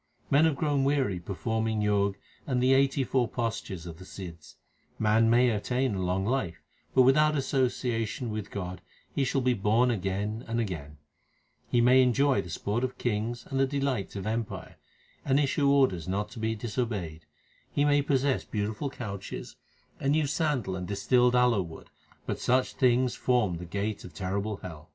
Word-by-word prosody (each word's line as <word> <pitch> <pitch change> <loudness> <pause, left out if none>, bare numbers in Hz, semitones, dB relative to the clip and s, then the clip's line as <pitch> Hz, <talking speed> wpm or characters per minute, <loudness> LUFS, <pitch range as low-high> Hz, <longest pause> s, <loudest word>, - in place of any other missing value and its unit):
Men 145 +3 +6
have 160 -3 +2
grown 145 -2 +1
weary 135 -9 +1
performing 110 +5 -2
Jog 100 -1 +2 0.3
and 130 -3 +1
the 130 +2 +4
eighty 135 0 +3
four 125 -1 +1
postures 110 -7 -4
of 80 -2 -8
the - - -10
Sidhs: 85 -6 -10 0.4
Man 110 +1 +3
may 120 +1 +5
attain 125 +3 0
a 95 - -2
long 90 +1 0
life, 100 -9 -2 0.3
but 130 - +7
without 150 +4 +4
association 125 -4 -1
with 105 -1 -4
God 90 -2 -5 0.3
he 140 - +1
shall 135 +1 +1
be 125 0 +2
born 115 +4 +2
again 105 +2 -2
and 115 +1 -1
again; 80 -9 -4 0.7
He 120 - +3
may 125 +2 +6
enjoy 130 +2 +3
the 90 - -10
sport 105 +8 -2
of 130 0 -2
kings 115 +1 -2
and 135 - 0
the 135 - +3
delights 135 -8 -2
of 100 -1 -4
empire, 110 -3 -4 0.5
and 135 +1 +2
issue 140 0 +2
orders 130 - +3
not 100 +3 -1
to 125 - -9
be 110 0 -1
disobeyed; 105 -8 -4 0.4
He 145 - +2
may 145 0 +4
possess 140 -1 +1
beautiful 110 +6 -3
couches, 100 -7 -7 0.4
and 140 +2 +1
use 150 -2 +1
sandal 135 - 0
and 90 -1 -5
distilled 125 +5 +3
aloe 125 -4 +4
wood, 85 -3 -10 0.3
but - - -3
such 130 +1 +1
things 125 -1 +3
form 115 -9 +1
the 90 - -7
gate 100 +3 -3
of 90 - -11
terrible 100 +2 -2
hell. 85 -2 -9
115 Hz, 175 wpm, -28 LUFS, 100-130 Hz, 0.7 s, but